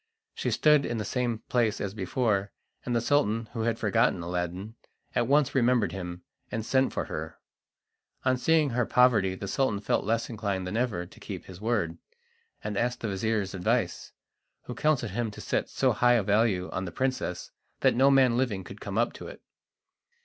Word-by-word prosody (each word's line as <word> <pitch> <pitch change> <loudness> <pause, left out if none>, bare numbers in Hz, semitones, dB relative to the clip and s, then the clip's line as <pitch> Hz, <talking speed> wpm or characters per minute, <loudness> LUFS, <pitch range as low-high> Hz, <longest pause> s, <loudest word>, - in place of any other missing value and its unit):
She - - -2
stood 150 -2 +4
in 120 -2 -2
the 105 - -3
same 120 -3 -2
place 115 -4 +1
as 100 -1 -3
before, 100 0 0 0.3
and 120 - -2
the 115 - +2
Sultan, 115 -5 +1
who 115 - -3
had 115 0 0
forgotten 95 -4 +2
Aladdin, 90 +4 -3 0.4
at 120 - +1
once 145 +1 +3
remembered 120 -7 +3
him, 90 -1 -6 0.3
and 110 -1 -3
sent 130 +1 +2
for - - -2
her. - - -6 0.9
On 130 0 +4
seeing 155 +2 +2
her 120 -1 0
poverty 110 -7 +4
the 100 - -6
Sultan 115 -3 0
felt 100 - 0
less 115 +2 0
inclined 100 -5 -3
than 90 +3 -4
ever 115 -8 -1
to - - -16
keep - - -7
his 95 0 -11
word, 105 -8 -1 0.6
and 105 -1 -3
asked 125 +1 -1
the 110 - -2
vizir's 100 0 -1
advice, 90 -2 -1 0.5
who 125 - -6
counselled 125 -4 +1
him 115 +2 -1
to 105 - -11
set - - -1
so - - +2
high 120 0 +4
a 115 -3 +3
value 100 -2 +2
on 95 - -3
the 85 - -5
princess 130 -4 -2 0.3
that - - +4
no 135 +3 +5
man 130 -3 +5
living 110 -7 0
could - - -11
come - - -4
up - - +2
to - - -9
it. - - -11
110 Hz, 190 wpm, -28 LUFS, 95-125 Hz, 0.9 s, no